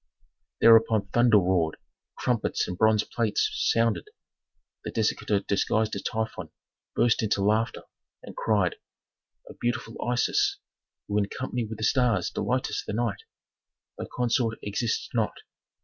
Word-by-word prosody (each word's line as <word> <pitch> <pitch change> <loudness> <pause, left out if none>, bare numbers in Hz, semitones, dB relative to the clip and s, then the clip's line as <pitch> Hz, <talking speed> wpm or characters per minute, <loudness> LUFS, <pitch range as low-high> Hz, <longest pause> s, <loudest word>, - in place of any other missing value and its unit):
Thereupon 110 -3 +5
thunder 120 0 +5
roared, 90 -4 +1 0.4
trumpets - - 0
and 90 - -4
bronze 110 +2 +3
plates 115 -3 0
sounded; 115 -1 +1 0.7
the - - -4
dissector 105 -2 0
disguised 110 +2 0
as - - -4
Typhon 110 -7 -3 0.5
burst 120 -2 +3
into 105 -2 0
laughter, 110 +3 +1 0.4
and - - -10
cried, 100 -5 +1 0.7
"O - - -10
beautiful 120 -1 -2
Isis, 120 0 +1 0.5
who 105 0 +1
in 100 - 0
company 125 -2 -3
with 110 0 -7
the 110 - -6
stars 115 -6 +2
delightest 130 +1 -2
the - - -3
night, 110 -4 -1 0.7
thy - - -6
consort 120 -2 0
exists 110 +3 -2
not. 115 -3 0
110 Hz, 130 wpm, -27 LUFS, 105-115 Hz, 0.7 s, Thereupon